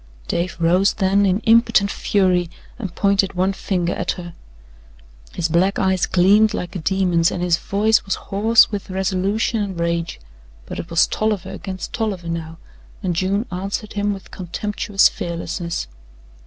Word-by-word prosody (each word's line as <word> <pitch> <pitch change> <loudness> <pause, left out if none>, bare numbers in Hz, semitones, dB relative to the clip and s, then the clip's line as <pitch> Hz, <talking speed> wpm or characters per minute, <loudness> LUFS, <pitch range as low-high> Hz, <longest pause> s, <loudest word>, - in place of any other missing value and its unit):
Dave 170 +1 -2
rose 180 +4 +3
then 200 0 +2
in 190 +3 +1
impotent 225 -3 +4
fury 180 -4 +1 0.3
and 195 -7 -6
pointed 200 -1 +2
one 185 +2 +1
finger 180 -2 -1
at - - -2
her. 175 -1 -9 1.0
His 170 - 0
black 180 +4 +2
eyes 190 -2 +1
gleamed 205 +4 +4
like 180 - -5
a - - -2
demon's 175 -1 +2
and 180 - -3
his 175 -1 +2
voice 215 +4 +1
was 195 - -1
hoarse 220 +4 +3
with 205 -1 -5
resolution 190 +4 0
and 195 -4 -4
rage, 170 - -2 0.5
but - - -7
it 170 - -6
was 170 0 +4
Tolliver 215 -4 -2
against 190 -2 -7
Tolliver 195 -7 -3
now, 165 -1 -5 0.5
and 180 -3 -1
June 195 +5 0
answered 195 +4 -4
him 205 0 0
with 195 -1 -8
contemptuous 195 +2 +1
fearlessness. 170 - -4
190 Hz, 155 wpm, -20 LUFS, 175-205 Hz, 1.0 s, impotent